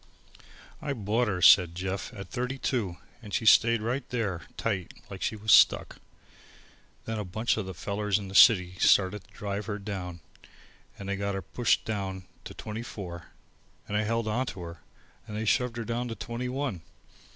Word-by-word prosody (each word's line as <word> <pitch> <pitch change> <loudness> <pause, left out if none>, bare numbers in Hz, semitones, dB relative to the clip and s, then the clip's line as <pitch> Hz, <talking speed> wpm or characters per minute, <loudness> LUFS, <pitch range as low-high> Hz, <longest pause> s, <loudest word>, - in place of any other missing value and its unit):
"I 140 - -2
bought 115 +1 0
her," 90 -4 -1
said 90 -4 +7
Jeff, 95 +4 -4
"at 100 -1 -7
thirty 125 +1 -2
two, 110 -10 -2 0.2
and 105 -3 -10
she 125 -2 -1
stayed 115 +1 +6
right 125 +4 -1
there 105 -8 -2
tight, 95 -6 -2 0.2
like 95 -2 -8
she 110 - -1
was 110 0 -1
stuck. - - +5 1.1
Then 110 -1 -3
a - - -2
bunch 110 +6 0
of 110 -4 -4
these 95 - -6
fellers 100 +3 -1
in 100 -2 -6
the 95 - -9
city 90 -5 +6
started 95 0 +3
to - - -25
drive 100 0 -4
her 105 -2 -2
down 95 -4 -6 0.8
and 100 - -8
they 100 0 -2
got 100 0 -2
her 95 - -4
pushed 120 +7 +1
down 95 -3 -3 0.2
to - - -8
twenty 110 +1 -6
four, 90 -7 -8 0.6
and 105 - -3
I 105 - +3
held 115 +1 -1
on 125 +4 0
to 95 - -6
her 85 -1 -8 0.5
and 105 - -6
they 110 - -2
shoved 120 +2 +1
her 115 - -3
down 120 +2 -2
to 115 - -5
twenty 120 +2 -4
one. 130 - -3
105 Hz, 190 wpm, -28 LUFS, 95-115 Hz, 1.1 s, said